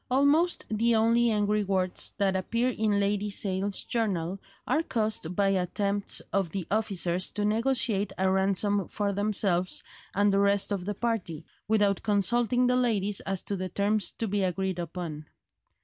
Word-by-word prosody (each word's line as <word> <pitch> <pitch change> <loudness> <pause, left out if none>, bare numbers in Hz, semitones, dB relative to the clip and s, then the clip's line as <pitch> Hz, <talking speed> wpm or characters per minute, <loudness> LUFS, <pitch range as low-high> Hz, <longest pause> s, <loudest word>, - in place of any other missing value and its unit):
Almost 285 +7 +3
the 230 +2 +2
only 230 +2 +3
angry 210 -1 +1
words 185 -2 -1
that 195 -1 +1
appear 230 +7 0
in 215 -4 0
Lady 205 +1 0
Sale's 195 0 -1
journal 195 -5 -2 0.3
are 310 - +1
caused 215 - -2
by 200 0 +2
attempts 200 +2 -1
of 195 -3 +1
the 185 +1 -4
officers 185 -4 0
to 210 - -1
negotiate 220 -2 +1
a 190 - +1
ransom 195 +1 +1
for 205 -1 -2
themselves 195 -3 +1 0.3
and 205 0 +3
the 195 - +3
rest 200 +1 +2
of 190 -3 -2
the 205 +1 -3
party, 210 -9 -3 0.2
without 205 -3 +2
consulting 235 +4 +1
the 250 0 +3
ladies 210 -5 +1
as 195 -1 -3
to 200 - -3
the 185 -1 -4
terms 200 +1 0
to 225 - -3
be 205 0 0
agreed 185 0 -1
upon. 165 -3 -6
200 Hz, 160 wpm, -28 LUFS, 190-220 Hz, 0.3 s, Almost